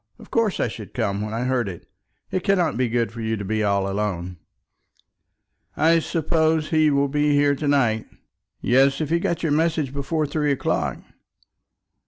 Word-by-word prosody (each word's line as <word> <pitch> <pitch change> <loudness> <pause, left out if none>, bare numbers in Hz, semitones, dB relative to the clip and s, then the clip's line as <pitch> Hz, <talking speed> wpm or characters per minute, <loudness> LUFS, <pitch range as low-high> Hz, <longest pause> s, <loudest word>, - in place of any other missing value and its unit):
Of - - -16
course 225 -4 +1
I - - +1
should 105 -3 -9
come 100 0 -1
when 105 0 -4
I 115 +2 -2
heard 125 -4 0
it. 90 - -10 0.4
It 185 - -1
cannot 180 -6 +2
be 125 0 0
good 115 -2 0
for 115 0 -8
you 110 0 -1
to 100 - -5
be 110 +2 -1
all 100 -1 +1
alone." 95 -3 -3 1.4
"I 165 +1 +4
suppose 160 -1 0
he 155 -1 +4
will 140 0 +2
be 150 +1 +1
here 145 0 +4
to 145 +1 -3
night?" 120 -6 +2 0.5
"Yes, 135 +2 +3
if 155 -1 -3
he 170 - +3
got 170 -1 -2
your 160 - +1
message 155 -3 +1
before 145 +3 -1
three 150 0 0
o'clock." 140 - -1
140 Hz, 180 wpm, -23 LUFS, 110-155 Hz, 1.4 s, I